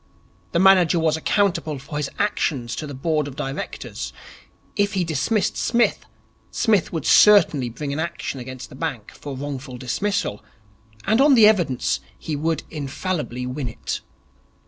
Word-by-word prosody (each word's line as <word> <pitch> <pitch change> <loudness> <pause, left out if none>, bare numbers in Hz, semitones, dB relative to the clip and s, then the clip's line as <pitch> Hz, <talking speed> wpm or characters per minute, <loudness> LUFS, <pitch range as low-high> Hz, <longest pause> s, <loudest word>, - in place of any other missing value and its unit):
The - - 0
manager 185 -2 +5
was 160 -1 +2
accountable 170 -3 0
for 145 +3 -7
his 150 -2 -2
actions 140 - -1
to 155 - -4
the 145 - -7
Board 150 +1 0
of 135 - -8
Directors. 135 0 -5 0.6
If 205 0 +1
he 190 -2 +1
dismissed 165 - 0
Psmith, 235 0 +1 0.4
Psmith 215 -7 +1
would 160 -4 -3
certainly 160 -11 +6
bring 140 +4 -5
an 145 - -3
action 160 -4 -4
against 130 0 -8
the - - -12
bank 135 -7 -4
for 140 -2 -8
wrongful 135 -2 -6
dismissal, 130 - -2 0.6
and 220 +4 +3
on 280 -1 +6
the 225 -3 +7
evidence 175 - +2 0.2
he 155 - -4
would 160 +2 -1
infallibly 145 -3 -3
win 130 +1 -4
it. - - -5
155 Hz, 150 wpm, -22 LUFS, 135-190 Hz, 0.6 s, the